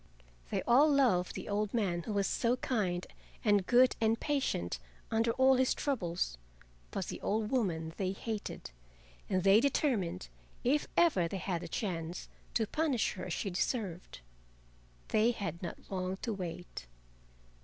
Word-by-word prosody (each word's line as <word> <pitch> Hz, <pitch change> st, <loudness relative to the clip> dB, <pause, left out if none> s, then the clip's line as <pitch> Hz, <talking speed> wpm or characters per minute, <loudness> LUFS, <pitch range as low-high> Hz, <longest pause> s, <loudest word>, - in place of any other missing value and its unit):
They -, -, -1 dB
all 275 Hz, +6 st, +6 dB
loved 240 Hz, -11 st, +3 dB
the -, -, -6 dB
old 205 Hz, +1 st, -1 dB
man 185 Hz, -7 st, +1 dB
who 210 Hz, -, -4 dB
was 200 Hz, -1 st, +1 dB
so 240 Hz, +4 st, +1 dB
kind 190 Hz, -9 st, -1 dB, 0.4 s
and 205 Hz, -3 st, +3 dB
good 250 Hz, +1 st, +5 dB
and 225 Hz, +1 st, +2 dB
patient 265 Hz, -, -1 dB, 0.3 s
under 225 Hz, +1 st, +2 dB
all 260 Hz, +1 st, +5 dB
his 260 Hz, 0 st, +3 dB
troubles, 175 Hz, -, -1 dB, 0.5 s
but -, -, -3 dB
the -, -, -6 dB
old 215 Hz, +1 st, -1 dB
woman 165 Hz, -11 st, 0 dB
they 190 Hz, -2 st, 0 dB
hated, 210 Hz, -, -5 dB, 0.6 s
and 185 Hz, -2 st, +1 dB
they 195 Hz, +2 st, +7 dB
determined, 230 Hz, -, 0 dB, 0.4 s
if 285 Hz, +4 st, +2 dB
ever 250 Hz, -, +4 dB
they 195 Hz, -, -4 dB
had 180 Hz, -2 st, -2 dB
the 175 Hz, -, -6 dB
chance, 170 Hz, -3 st, -4 dB, 0.3 s
to 225 Hz, -, +3 dB
punish 295 Hz, -1 st, 0 dB
her 185 Hz, -, -6 dB
as 180 Hz, -, -3 dB
she 195 Hz, -, -2 dB
deserved. 180 Hz, -, -3 dB, 0.9 s
They 215 Hz, +2 st, +4 dB
had 200 Hz, -7 st, -3 dB
not 175 Hz, -, -5 dB
long 185 Hz, 0 st, -2 dB
to 230 Hz, -, -1 dB
wait. 175 Hz, -, -6 dB
205 Hz, 155 wpm, -33 LUFS, 180-240 Hz, 0.9 s, they